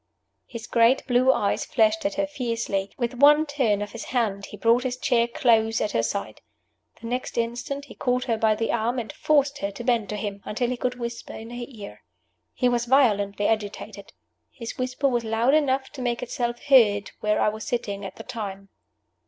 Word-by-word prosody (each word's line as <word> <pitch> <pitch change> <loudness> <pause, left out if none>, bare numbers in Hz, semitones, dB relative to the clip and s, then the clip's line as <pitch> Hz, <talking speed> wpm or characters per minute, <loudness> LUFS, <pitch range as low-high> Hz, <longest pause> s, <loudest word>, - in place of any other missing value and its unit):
His 230 -2 -8
great 235 +4 +3
blue 255 +1 +4
eyes 205 -6 0
flashed 220 -2 +2
at 200 - -5
her 295 - +1
fiercely. 230 -8 -3
With 240 -1 -1
one 295 +2 +7
turn 245 -9 0
of 205 - -8
his 230 - -7
hand 210 -6 -1
he 210 - -10
brought 230 +4 +3
his 250 -1 -3
chair 235 -2 +2
close 225 -2 +2
at 210 - -1
her 115 - +1
side. 115 +13 -4 0.6
The - - -11
next 250 +2 -3
instant 240 +5 -2
he - - -12
caught 250 -1 0
her 240 -3 0
by 220 -1 +2
the 225 +1 -1
arm, 235 +2 0
and 230 -3 -4
forced 285 -1 +1
her 200 - -2
to 205 +4 -8
bend 230 -5 +1
to 210 - -3
him, 200 -1 -5
until 240 +3 -2
he 250 - -2
could 250 +1 -2
whisper 235 -1 -6
in 225 +1 -9
her 240 0 -5
ear. 210 -6 -11 0.5
He 250 - +2
was 240 -1 +1
violently 205 -6 +3
agitated. 215 -2 -3 0.4
His 230 -3 -7
whisper 255 +2 -1
was 240 -3 0
loud 225 +4 +1
enough 270 -3 +1
to 275 - -8
make 240 -1 -1
itself 240 0 -3
heard 220 -8 +4
where 210 0 +1
I - - +3
was 220 +1 -6
sitting 205 -5 -3
at 190 - -7
the - - -9
time. 195 -3 -6
235 Hz, 200 wpm, -25 LUFS, 215-255 Hz, 0.6 s, one